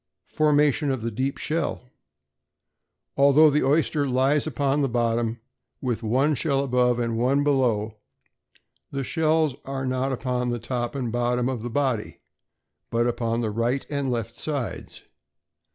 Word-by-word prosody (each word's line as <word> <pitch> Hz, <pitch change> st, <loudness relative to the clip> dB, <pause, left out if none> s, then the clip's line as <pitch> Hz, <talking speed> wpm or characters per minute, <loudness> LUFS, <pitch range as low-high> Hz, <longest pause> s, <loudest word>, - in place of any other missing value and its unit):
=Formation 150 Hz, -1 st, +3 dB
of 130 Hz, -4 st, -2 dB
the 115 Hz, -, -2 dB
Deep 130 Hz, +5 st, -2 dB
Shell.= 160 Hz, -3 st, -2 dB, 1.3 s
Although 140 Hz, +2 st, +6 dB
the 150 Hz, -, +2 dB
oyster 145 Hz, +1 st, +2 dB
lies 135 Hz, +4 st, +2 dB
upon 140 Hz, +1 st, 0 dB
the 135 Hz, -, +1 dB
bottom 115 Hz, -1 st, 0 dB, 0.4 s
with 120 Hz, -4 st, -2 dB
one 130 Hz, +7 st, +2 dB
shell 140 Hz, 0 st, 0 dB
above 125 Hz, -2 st, +2 dB
and 115 Hz, -1 st, -1 dB
one 135 Hz, +4 st, +2 dB
below, 115 Hz, -7 st, +1 dB, 0.9 s
the 140 Hz, -1 st, -3 dB
shells 155 Hz, -1 st, +1 dB
are 135 Hz, 0 st, -4 dB
not 130 Hz, +1 st, -1 dB
upon 125 Hz, -1 st, -2 dB
the 120 Hz, -, -1 dB
top 120 Hz, +2 st, -3 dB
and 125 Hz, -4 st, -2 dB
bottom 120 Hz, +1 st, 0 dB
of 130 Hz, -4 st, -2 dB
the 120 Hz, -, -4 dB
body, 130 Hz, -4 st, -1 dB, 0.7 s
but 115 Hz, 0 st, +1 dB
upon 115 Hz, -1 st, -1 dB
the 110 Hz, -2 st, -1 dB
right 120 Hz, +5 st, -1 dB
and 140 Hz, -2 st, -1 dB
left 115 Hz, -2 st, -2 dB
sides. 140 Hz, -5 st, -5 dB
130 Hz, 145 wpm, -25 LUFS, 120-140 Hz, 1.3 s, Although